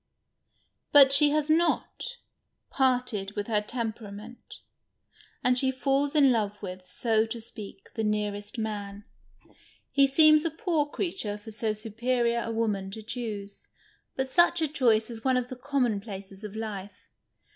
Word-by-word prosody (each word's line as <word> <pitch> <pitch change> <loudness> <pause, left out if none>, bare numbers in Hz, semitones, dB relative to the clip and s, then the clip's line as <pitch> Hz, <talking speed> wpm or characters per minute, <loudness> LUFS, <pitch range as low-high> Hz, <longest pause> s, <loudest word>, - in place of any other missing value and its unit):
But 275 -2 +8
she 290 +1 +6
has 300 0 +1
not 340 +9 0 0.5
parted 250 -7 0
with 205 -1 -3
her 210 -2 +1
temperament, 220 0 -7 0.9
and 250 0 +3
she 265 0 +2
falls 275 +2 0
in 280 -3 +6
love 210 -3 -1
with, 185 -2 -8
so 220 +4 +1
to 230 +1 -5
speak, 210 -3 -10
the 225 - -2
nearest 210 0 -2
man. 205 -2 -5 0.9
lie 280 -1 +6
seems 305 +2 +6
a 330 - +1
poor 320 -4 -1
creature 290 - -3
for 210 +2 -11
so 215 0 -1
superior 235 +2 0
a 230 - -4
woman 210 -4 -1
to 220 +3 -7
choose 210 -4 -5 0.2
— - - -40
but 265 0 0
such 345 +4 +4
a 320 - +1
choice 240 -6 +2
is 225 -1 -8
one 260 -1 +2
of 250 0 -2
the 255 - -6
conmionplaces 215 -7 -3
of 210 0 -7
life. 205 -3 -7
230 Hz, 150 wpm, -28 LUFS, 210-270 Hz, 0.9 s, But